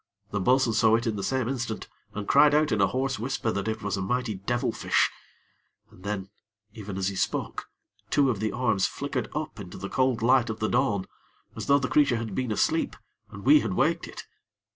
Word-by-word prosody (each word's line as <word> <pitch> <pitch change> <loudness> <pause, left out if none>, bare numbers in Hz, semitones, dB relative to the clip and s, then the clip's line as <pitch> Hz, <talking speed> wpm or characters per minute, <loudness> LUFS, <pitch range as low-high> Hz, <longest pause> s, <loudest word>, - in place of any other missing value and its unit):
The 100 - -1
bo'sun 125 +3 +3
saw 110 0 +4
it 115 - -1
in 115 -2 -1
the 100 - -3
same 130 +2 -1
instant 120 -4 -3 0.3
and 105 -1 -4
cried 150 -1 +6
out 150 -2 +3
in 105 - +2
a 95 - +5
hoarse 130 +3 -1
whisper 125 -1 -1
that 100 +1 -3
it 110 -1 -3
was 100 -1 -1
a - - -2
mighty 125 +3 -1
devilfish, 110 +6 0 0.8
and 90 - -17
then, 100 -1 -4 0.4
even 105 -4 -7
as 95 0 0
he 100 - -6
spoke, - - -2 0.4
two 140 -2 +3
of 110 - -4
the 110 0 -1
arms 110 -6 +1
flickered 140 -4 -4
up 150 -6 -4
into 90 -3 -8
the 100 - -6
cold 130 -3 +1
light 125 -1 +4
of 110 0 -4
the 110 - 0
dawn, 110 -7 +1 0.5
as - - -6
though 140 - +6
the 135 -2 -1
creature 140 -5 +3
had 115 -1 -4
been 130 -3 -2
asleep, 160 +9 +1 0.3
and - - -10
we 305 +1 +7
had - - -2
waked - - +1
it. - - -9
115 Hz, 210 wpm, -27 LUFS, 105-130 Hz, 0.8 s, we